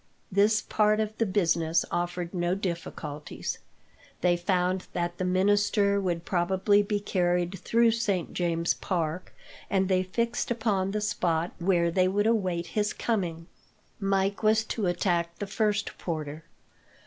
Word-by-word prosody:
This 210 Hz, +3 st, +3 dB
part 215 Hz, 0 st, +2 dB
of 215 Hz, 0 st, -2 dB
the 225 Hz, -, +2 dB
business 165 Hz, -4 st, +2 dB
offered 175 Hz, 0 st, -2 dB
no 175 Hz, 0 st, 0 dB
difficulties. 170 Hz, -5 st, -5 dB, 0.6 s
They 175 Hz, 0 st, +4 dB
found 180 Hz, +1 st, 0 dB
that 175 Hz, 0 st, -2 dB
the -, -, 0 dB
minister 200 Hz, +2 st, +2 dB
would 175 Hz, -3 st, -2 dB
probably 190 Hz, +3 st, +2 dB
be 205 Hz, 0 st, -1 dB
carried 180 Hz, -2 st, 0 dB
through 230 Hz, +3 st, +3 dB
Saint 205 Hz, -6 st, -1 dB
James's 170 Hz, -1 st, +1 dB
Park, 170 Hz, -1 st, -3 dB, 0.4 s
and 190 Hz, -1 st, +1 dB
they 185 Hz, -1 st, +3 dB
fixed 235 Hz, +6 st, -1 dB
upon 215 Hz, -5 st, 0 dB
the 210 Hz, +1 st, -2 dB
spot 175 Hz, -5 st, 0 dB
where 170 Hz, -1 st, +2 dB
they 185 Hz, +1 st, +3 dB
would 205 Hz, +2 st, +1 dB
await 185 Hz, -7 st, +1 dB
his 210 Hz, -1 st, 0 dB
coming. 175 Hz, -8 st, -2 dB, 0.5 s
Mike 195 Hz, 0 st, 0 dB
was 220 Hz, 0 st, +3 dB
to 215 Hz, -2 st, -2 dB
attack 175 Hz, -1 st, 0 dB
the 205 Hz, -, -3 dB
first 210 Hz, 0 st, -1 dB
porter. 155 Hz, -2 st, -4 dB
185 Hz, 140 wpm, -28 LUFS, 175-205 Hz, 0.6 s, They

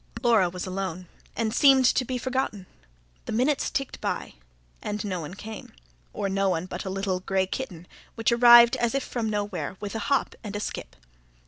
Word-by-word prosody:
Laura 225 Hz, -7 st, +4 dB
was 180 Hz, +1 st, -6 dB
alone, 185 Hz, -2 st, -4 dB, 0.3 s
and 220 Hz, -2 st, -1 dB
seemed 270 Hz, 0 st, +6 dB
to 255 Hz, -, +3 dB
be 255 Hz, +1 st, -3 dB
forgotten 255 Hz, -6 st, -2 dB, 0.6 s
The -, -, -5 dB
minutes 260 Hz, +6 st, +1 dB
ticked 275 Hz, -2 st, -4 dB
by, -, -, -3 dB, 0.5 s
and 210 Hz, 0 st, -3 dB
no 185 Hz, -3 st, -2 dB
one 165 Hz, +4 st, -7 dB
came 220 Hz, +1 st, -9 dB, 0.4 s
or -, -, -3 dB
no 195 Hz, 0 st, +1 dB
one 175 Hz, -1 st, -1 dB
but 185 Hz, -, -6 dB
a -, -, -3 dB
little 190 Hz, -1 st, -2 dB
grey 190 Hz, +1 st, 0 dB
kitten, 185 Hz, -5 st, -6 dB, 0.3 s
which 225 Hz, 0 st, +1 dB
arrived 235 Hz, 0 st, +8 dB
as 235 Hz, +2 st, 0 dB
if 275 Hz, -, 0 dB
from 230 Hz, -3 st, -3 dB
nowhere, 200 Hz, -5 st, -3 dB
with 205 Hz, -1 st, -5 dB
a 225 Hz, -, -3 dB
hop 275 Hz, -, +1 dB
and 210 Hz, -2 st, -6 dB
a -, -, -2 dB
skip. -, -, -6 dB
210 Hz, 190 wpm, -26 LUFS, 190-240 Hz, 0.6 s, arrived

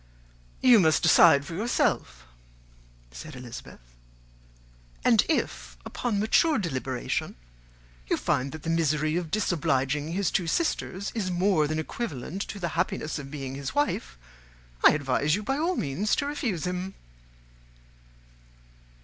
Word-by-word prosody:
"You 245 Hz, -4 st, +8 dB
must 160 Hz, -4 st, +3 dB
decide 160 Hz, -3 st, +6 dB
for 165 Hz, -, -7 dB
yourself," 165 Hz, -, -1 dB, 0.9 s
said 150 Hz, -, -9 dB
Elizabeth; 125 Hz, -2 st, -9 dB, 1.3 s
"and -, -, +5 dB
if, -, -, -2 dB
upon 230 Hz, -5 st, -2 dB
mature 280 Hz, +8 st, +3 dB
deliberation, 130 Hz, -, -3 dB, 0.7 s
you -, -, +1 dB
find 130 Hz, +2 st, 0 dB
that 155 Hz, -1 st, -9 dB
the 165 Hz, -, -1 dB
misery 155 Hz, -1 st, +1 dB
of 175 Hz, -2 st, -2 dB
disobliging 150 Hz, -5 st, 0 dB
his 195 Hz, 0 st, 0 dB
two 180 Hz, -, 0 dB
sisters 200 Hz, -, -1 dB
is 210 Hz, -5 st, -2 dB
more 180 Hz, -3 st, +2 dB
than 155 Hz, +1 st, -2 dB
equivalent 160 Hz, -, -4 dB
to 205 Hz, -, -7 dB
the 170 Hz, -3 st, -2 dB
happiness 160 Hz, -2 st, -2 dB
of 135 Hz, -1 st, -8 dB
being 135 Hz, -2 st, -6 dB
his 135 Hz, 0 st, -5 dB
wife, 290 Hz, -, -1 dB, 0.7 s
I -, -, +8 dB
advise 145 Hz, +1 st, +1 dB
you, 210 Hz, -, -4 dB
by 270 Hz, +6 st, -1 dB
all 350 Hz, +4 st, +1 dB
means, 170 Hz, -, 0 dB
to 280 Hz, -, -1 dB
refuse 250 Hz, -, -2 dB
him." 180 Hz, +1 st, -4 dB
165 Hz, 130 wpm, -27 LUFS, 145-200 Hz, 1.3 s, You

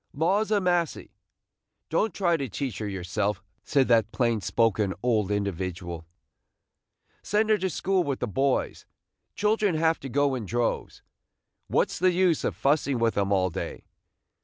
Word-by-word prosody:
"Laws 190 Hz, +8 st, +1 dB
a 210 Hz, -1 st, +3 dB
massy! 175 Hz, -4 st, -1 dB, 0.8 s
don't 210 Hz, +7 st, +1 dB
try 175 Hz, -1 st, +1 dB
to 140 Hz, -5 st, -3 dB
teach 130 Hz, +4 st, -4 dB
her 105 Hz, -, -3 dB
yourself," 100 Hz, +2 st, -2 dB, 0.2 s
said 135 Hz, -2 st, +2 dB
that 115 Hz, -2 st, +3 dB
plain 115 Hz, -4 st, 0 dB
spoken 105 Hz, -3 st, +1 dB
old 110 Hz, -5 st, +1 dB
individual, 90 Hz, -4 st, -3 dB, 0.6 s
– -, -, -59 dB, 0.3 s
"send 215 Hz, +1 st, +1 dB
her 215 Hz, -, +5 dB
to 190 Hz, -, -1 dB
school 185 Hz, +2 st, 0 dB
with 140 Hz, -4 st, -2 dB
the 125 Hz, -, -2 dB
boys. 135 Hz, +6 st, -1 dB, 0.5 s
Children 210 Hz, -3 st, +1 dB
have 160 Hz, +1 st, +2 dB
to 135 Hz, -, -7 dB
go 140 Hz, +1 st, +2 dB
in 120 Hz, -6 st, -4 dB
droves. 120 Hz, +3 st, -2 dB, 0.6 s
What -, -, +1 dB
's -, -, -5 dB
the 185 Hz, +1 st, +3 dB
use 180 Hz, -3 st, +2 dB
of -, -, -1 dB
fussing 140 Hz, -2 st, +1 dB
with 115 Hz, -1 st, +1 dB
'em 100 Hz, 0 st, 0 dB
all 95 Hz, -2 st, +2 dB
day? -, -, -5 dB
130 Hz, 160 wpm, -26 LUFS, 105-175 Hz, 0.8 s, her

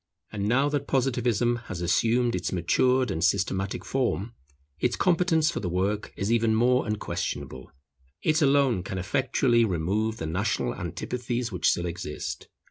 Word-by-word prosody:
And 105 Hz, -1 st, -2 dB
now 135 Hz, +4 st, +3 dB
that 145 Hz, -1 st, -2 dB
Positivism 120 Hz, -3 st, +1 dB
has 90 Hz, -, -5 dB
assumed 115 Hz, +7 st, +2 dB
its 90 Hz, 0 st, -2 dB
matured 125 Hz, +8 st, +2 dB
and 80 Hz, -3 st, -2 dB
systematic 95 Hz, 0 st, 0 dB
form, 120 Hz, -4 st, -1 dB, 0.5 s
its 125 Hz, -, +1 dB
competence 170 Hz, -3 st, +2 dB
for -, -, -3 dB
the 90 Hz, -, -3 dB
work 100 Hz, +4 st, -1 dB
is 100 Hz, +3 st, -1 dB
even 115 Hz, -1 st, +3 dB
more 125 Hz, +2 st, +3 dB
unquestionable. 85 Hz, -10 st, -4 dB, 0.5 s
It 155 Hz, +1 st, +2 dB
alone 135 Hz, -7 st, +3 dB
can 95 Hz, +1 st, -5 dB
effectually 120 Hz, +3 st, +2 dB
remove 105 Hz, +4 st, 0 dB
the 80 Hz, -, -4 dB
national 85 Hz, -, -1 dB
antipathies 120 Hz, -1 st, -4 dB
which 90 Hz, -4 st, +2 dB
still 85 Hz, -, 0 dB
exist. 85 Hz, -3 st, -5 dB
115 Hz, 145 wpm, -26 LUFS, 95-125 Hz, 0.5 s, now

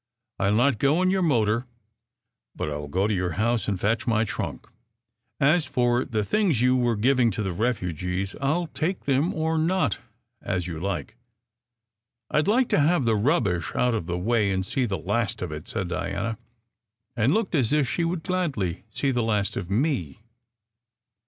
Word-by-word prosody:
I 95 Hz, -, +2 dB
ll 105 Hz, -, +2 dB
not 125 Hz, 0 st, +3 dB
go 150 Hz, +6 st, +3 dB
in 185 Hz, -, +3 dB
your 190 Hz, 0 st, +1 dB
motor, 120 Hz, -, +1 dB, 0.9 s
but 75 Hz, -, -3 dB
I -, -, -2 dB
ll 75 Hz, 0 st, -5 dB
go 95 Hz, +7 st, 0 dB
to 105 Hz, -, +1 dB
your 90 Hz, -3 st, -1 dB
house 115 Hz, +3 st, 0 dB
and 100 Hz, -3 st, -1 dB
fetch 115 Hz, +5 st, 0 dB
my 110 Hz, -1 st, +3 dB
trunk. 115 Hz, -, -4 dB, 0.7 s
As 150 Hz, +4 st, +4 dB
for 120 Hz, 0 st, +1 dB
the 110 Hz, -4 st, -1 dB
things 190 Hz, -, +1 dB
you 125 Hz, +1 st, +4 dB
were 120 Hz, -2 st, +2 dB
giving 125 Hz, +2 st, +3 dB
to 105 Hz, 0 st, -3 dB
the 95 Hz, -2 st, -2 dB
refugees, 90 Hz, -3 st, -2 dB
I 135 Hz, -, +1 dB
ll 175 Hz, +2 st, 0 dB
take 175 Hz, +4 st, -2 dB
them 140 Hz, +5 st, +2 dB
or 160 Hz, 0 st, 0 dB
not, 170 Hz, -, +1 dB, 0.4 s
as 90 Hz, -2 st, -2 dB
you 85 Hz, -3 st, -5 dB
like." 100 Hz, +5 st, -4 dB, 0.6 s
" 115 Hz, +1 st, -35 dB
I 150 Hz, -, +3 dB
d 175 Hz, -, -1 dB
like 245 Hz, +3 st, +3 dB
to -, -, +3 dB
have 150 Hz, -1 st, +3 dB
the 115 Hz, -1 st, +3 dB
rubbish 105 Hz, -, +1 dB
out 125 Hz, -1 st, +2 dB
of 105 Hz, -7 st, -2 dB
the 90 Hz, 0 st, -2 dB
way 105 Hz, +2 st, +1 dB
and 95 Hz, -1 st, -1 dB
see 125 Hz, +5 st, 0 dB
the 100 Hz, -4 st, -2 dB
last 105 Hz, +6 st, -1 dB
of 90 Hz, -, -4 dB
it," 75 Hz, 0 st, -7 dB
said 90 Hz, -, -3 dB
Diana; 100 Hz, +5 st, -3 dB, 0.8 s
and 120 Hz, +3 st, +2 dB
looked 215 Hz, +2 st, 0 dB
as 130 Hz, -8 st, +2 dB
if 150 Hz, -3 st, +2 dB
she 170 Hz, -, -1 dB
would 165 Hz, -1 st, -2 dB
gladly 140 Hz, -, -2 dB
see 135 Hz, +5 st, -1 dB
the 120 Hz, -2 st, 0 dB
last 105 Hz, -3 st, 0 dB
of 90 Hz, -, -4 dB
me. 105 Hz, -, 0 dB
115 Hz, 195 wpm, -25 LUFS, 100-140 Hz, 0.9 s, As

